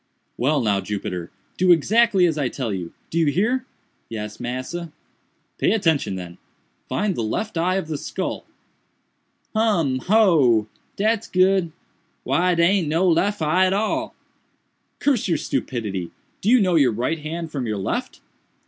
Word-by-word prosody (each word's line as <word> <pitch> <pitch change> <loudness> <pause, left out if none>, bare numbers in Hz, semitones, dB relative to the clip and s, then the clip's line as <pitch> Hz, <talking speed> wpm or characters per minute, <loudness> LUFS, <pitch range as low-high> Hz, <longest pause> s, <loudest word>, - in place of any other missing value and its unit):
"Well 140 +3 +1
now, 100 -4 +1
Jupiter, 90 -4 -4 0.3
do 185 0 +4
exactly 200 +3 +4
as 165 -3 +1
I 140 -4 -1
tell 120 -6 -3
you—do 95 - -5
you 160 - +3
hear?" 235 - +1 0.4
"Yes, 105 -2 -6
massa." 130 +8 -5 0.7
"Pay - - +3
attention, 160 - +1
then—find 95 - -6
the - - -2
left 175 - -3
eye 175 +3 +1
of 190 -4 -2
the 155 -3 -4
skull." - - -4 1.1
"Hum! 175 -12 +2
hoo! 155 - +4 0.3
dat's 220 +2 0
good! 185 -2 +2 0.5
why 180 +1 +2
dare 170 0 +4
aint 190 -4 +2
no 170 +4 +2
eye - - +5
lef 200 +2 0
at 185 +5 +3
all." 215 +2 -1 0.8
"Curse 270 -8 +1
your 170 -4 +1
stupidity! 110 -11 -3 0.3
do 205 - 0
you 250 +1 +6
know 185 -4 +2
your 140 -8 +4
right 125 +9 -1
hand 160 +2 -5
from 135 -5 -3
your 105 -1 -2
left?" 95 - -3
165 Hz, 150 wpm, -22 LUFS, 125-190 Hz, 1.1 s, you